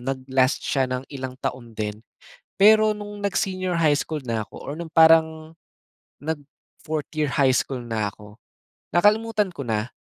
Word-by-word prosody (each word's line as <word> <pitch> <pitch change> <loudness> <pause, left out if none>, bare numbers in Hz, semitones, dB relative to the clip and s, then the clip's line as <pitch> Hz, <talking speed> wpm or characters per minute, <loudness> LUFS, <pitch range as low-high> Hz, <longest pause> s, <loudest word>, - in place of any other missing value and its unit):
nag-last 130 0 0
siya 135 -2 0
ng 130 +1 -3
ilang 130 -2 -6
taon 120 -3 -5
din. 105 0 -4 0.6
Pero 215 +1 +5
no'ng 205 0 -8
nag-senior 185 -2 -1
high 150 -3 +4
school 155 -3 -4
na 115 -4 -3
ako - - -15
or 140 - -5
no'ng 170 - -5
parang 160 -1 +5 0.7
nag-4th 150 0 -6
year 150 -2 0
high 130 -1 +3
school 130 0 -1
na 110 -3 -2
ako, 105 0 -15 0.6
nakalimutan 210 +2 +2
ko 170 - -9
na 110 +1 -2
145 Hz, 150 wpm, -24 LUFS, 125-175 Hz, 0.7 s, Pero